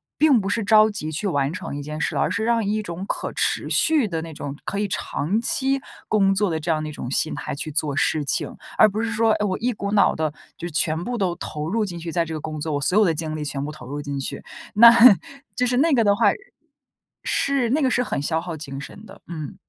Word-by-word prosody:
并 295 -6 +4
不 195 - -3
是 210 +2 0
着 215 +2 +5
急 155 -7 -5
去 160 +7 -4
完 145 -7 0
成 170 -4 -6
一 145 - -4
件 150 +1 -6
事 - - -1
了， - - +1
而 - - +1
是 225 - -2
让 230 -1 +2
一 215 +2 -1
种 175 -1 -6
可 - - -3
持 - - 0
续 305 -7 +3
的 165 -4 -3
那 165 0 -8
种 140 0 -6
可 200 - -4
以 205 0 0
长 195 +2 -2
期 270 +2 0 0.3
工 195 -2 +3
作 205 -2 +1
的 160 - -1
这 160 +2 -5
样 155 -1 -1
一 155 - -5
种 125 - -6
心 155 +4 0
态 150 - -5
去 155 +2 -5
做 145 -2 -1
事 150 +2 +1
情。 140 - -2 0.2
而 - - +7
不 215 +1 -2
是 225 0 -2
说， 225 -1 +2
哎， 210 - 0
我 190 -3 -1
一 245 +2 -1
股 200 -1 -4
脑 200 -2 +4
地， 155 -2 -1 0.2
就 175 - -6
全 160 +1 0
部 245 +1 -3
都 180 -4 0
投 150 +1 -5
入 220 +5 0
进 180 -4 -5
去 170 0 -6
在 170 0 +1
这 165 - -8
个 - - -4
工 155 0 -6
作， 155 0 -2
我 145 - 0
所 150 +6 0
有 - - +6
的 170 -5 +2
精 155 0 -3
力 155 - -4
全 140 -1 -3
部 150 - -5
投 140 -5 -11
入 145 +1 -4
进 140 -1 -4
去。 135 - -4 0.3
那 230 +2 +10 0.6
就 250 - +1
是 245 0 +1
那 310 +4 +3
个 235 -4 +4
的 200 -1 +3
话 225 - +3 1.0
是， 275 -4 +1
那 295 +6 +1
个 265 - +3
是 250 0 +1
很 190 - -3
消 160 +2 -1
耗 170 -2 -6
精 140 -2 -7
神 200 +8 -11
的， 200 -1 -14
嗯。 165 +1 -6
180 Hz, 285 characters per minute, -23 LUFS, 155-220 Hz, 1.0 s, 那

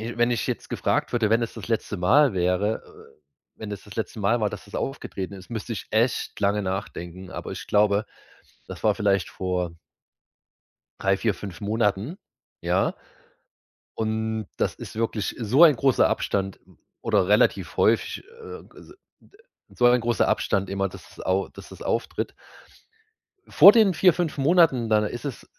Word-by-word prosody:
wenn 120 +1 0
ich 120 -3 -1
jetzt - - -4
gefragt - - -1
würde, 115 -3 +1
wenn 115 +1 +3
es 115 - -4
das - - -8
letzte 110 -2 -1
Mal 135 +10 +4
wäre, 90 +4 0
äh, 435 0 -18 0.3
wenn 110 -1 -7
es 100 - -8
das 105 - -12
letzte 110 -1 -4
Mal 115 +4 +2
war, 105 - +1
dass 105 - -8
das 100 - -16
aufgetreten 100 -8 -4
ist, 95 +2 -13
müsste 115 0 -4
ich 110 - -6
echt 115 +3 0
lange 100 +1 +1
nachdenken. 95 -2 -5
Aber - - -6
ich - - -7
glaube, 105 0 +3 0.6
das - - -9
war 105 - +4
vielleicht 100 -3 +1
vor 90 -2 -3 1.2
3, 95 0 +1
4, 110 -4 0
5 100 -1 -9
Monaten, 105 - -1 0.5
ja? - - +1 1.0
Und 110 -1 -2
das - - 0
ist - - -10
wirklich 110 -2 -2
so 125 +9 +3
ein 155 -4 +7
großer 135 +1 +3
Abstand 95 -1 -2 0.4
oder 90 - +1
relativ 105 +1 +2
häufig, - - +2
äh, 465 -1 -10
also - - -15 0.3
d 405 - -24 0.3
so 120 - +2
ein 120 0 +4
großer 120 0 +1
Abstand 100 -1 0
immer, 95 0 -1
dass - - -13
das - - -12
au 95 +1 0
dass - - -13
das - - -12
auftritt. - - -2 1.1
Vor 200 - +9
den 210 -5 +4
4, 185 -2 +5
5 160 -3 -3
Monaten, 140 -6 +3
dann 105 -1 +3
ist 120 +5 -5
es, 140 -4 -6
110 Hz, 170 wpm, -25 LUFS, 100-120 Hz, 1.2 s, Vor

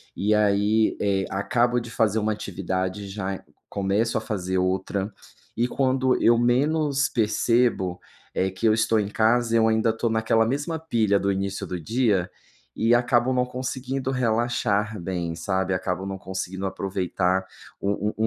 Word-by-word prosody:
e 105 +2 +1
aí, 105 +1 +2
eh, 95 -1 +1
acabo 120 +5 +1
de 120 -1 -9
fazer 110 -2 +1
uma 110 +1 0
atividade, 95 -1 -3
já 95 -1 -4
c-começo 100 +4 -2
a 110 - -1
fazer 95 -4 -2
outra. 95 +2 -1 0.4
E 120 +2 +1
quando 130 0 +1
eu 115 0 +6
menos 140 +4 +2
percebo 110 -4 +1 0.4
eh, 95 0 +1
que 110 +5 -1
eu 110 - +5
estou 110 0 +2
em 100 - -1
casa 115 +2 +2
eu 110 0 +4
ainda 110 0 +2
estou 115 +1 0
naquela 110 0 +2
mesma 145 +7 -2
pilha 115 -11 +1
do 100 - +1
início 95 0 -2
do 90 - -4
dia 105 -1 +1 0.5
e 115 +2 +2
acabo 120 +1 +3
não 125 0 +2
conseguindo 130 +1 -3
relaxar 110 -4 0
bem, 85 -2 -3
sabe? 95 +1 -1
Acabo 90 0 -2
não 95 0 -4
conseguindo 95 +1 -4
aproveitar 95 -1 -1 0.4
o 100 +1 0
o - - -6
110 Hz, 155 wpm, -24 LUFS, 95-120 Hz, 0.5 s, eu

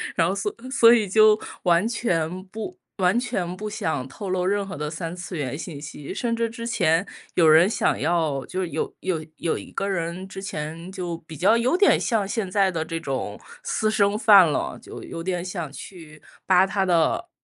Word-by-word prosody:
然 165 -1 +3
后 190 - -1
所 200 +1 -2 0.2
所 240 -3 +6
以 215 -4 +2
就 215 +2 +5 0.2
完 175 +4 +3
全 185 -6 -1
不 225 - -7 0.2
完 185 +3 +3
全 190 -8 -2
不 210 +2 -5
想 160 -10 -2
透 195 +6 -7
露 185 -1 0
任 200 0 0
何 190 - -6
的 150 +1 -3
三 165 +2 -5
次 180 -1 -6
元 140 -1 -3
信 155 -3 -7
息。 150 +1 -7
甚 230 +2 -1
至 230 0 -1
之 230 0 -6
前 165 -4 +2 0.3
有 170 -3 +5
人 160 +4 +7
想 - - +1
要 155 -3 0
就 185 0 -3
有 160 -2 -3
有 165 -4 -2
有 165 - -1
一 - - -10
个 195 - -2
人 180 0 -3
之 190 0 -8
前 165 0 -6
就 175 -3 -4
比 160 -2 -11
较 200 +6 +4
有 255 +9 +2
点 405 - +5
像 215 -5 0
现 200 -3 -2
在 195 -1 +3
的 165 -3 -2
这 165 +1 -4
种 130 -8 -4 0.2
私 215 - 0
生 205 -1 +2
饭 200 -7 +7
了， - - -2
就 - - -10
有 165 - -7
点 180 -1 -2
想 170 -6 -5
去 155 -2 -11 0.2
扒 185 0 +5
他 195 0 0
的 170 -3 +1
185 Hz, 215 characters per minute, -24 LUFS, 165-205 Hz, 0.3 s, 人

